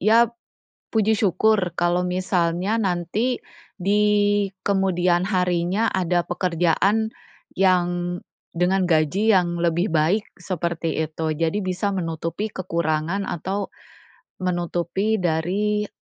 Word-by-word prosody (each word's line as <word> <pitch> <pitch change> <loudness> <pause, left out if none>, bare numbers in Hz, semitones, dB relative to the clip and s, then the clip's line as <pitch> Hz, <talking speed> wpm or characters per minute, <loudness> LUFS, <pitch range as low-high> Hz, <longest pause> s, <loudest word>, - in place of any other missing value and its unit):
ya, 225 +3 +4 0.6
puji 220 -1 +2
syukur 200 -2 +2
kalau 175 +1 +2
misalnya 180 +2 0
nanti 205 +4 -1 0.4
di 205 +3 +2 0.6
kemudian 185 -2 +2
harinya 180 +2 +1
ada 180 -1 +1
pekerjaan 180 +5 +1 0.5
yang 175 -1 +1 0.3
dengan 180 +2 +1
gaji 175 +6 +2
yang 175 -2 +2
lebih 175 +3 +1
baik, 170 +7 +2
seperti 170 -3 -2
itu, 160 0 -2
jadi 165 +5 -1
bisa 185 +2 -1
menutupi 165 +5 -3
kekurangan 170 +1 -1
atau, 190 +4 -3 0.7
menutupi 175 +4 -1
dari, 195 +6 0
180 Hz, 95 wpm, -23 LUFS, 170-200 Hz, 0.7 s, ya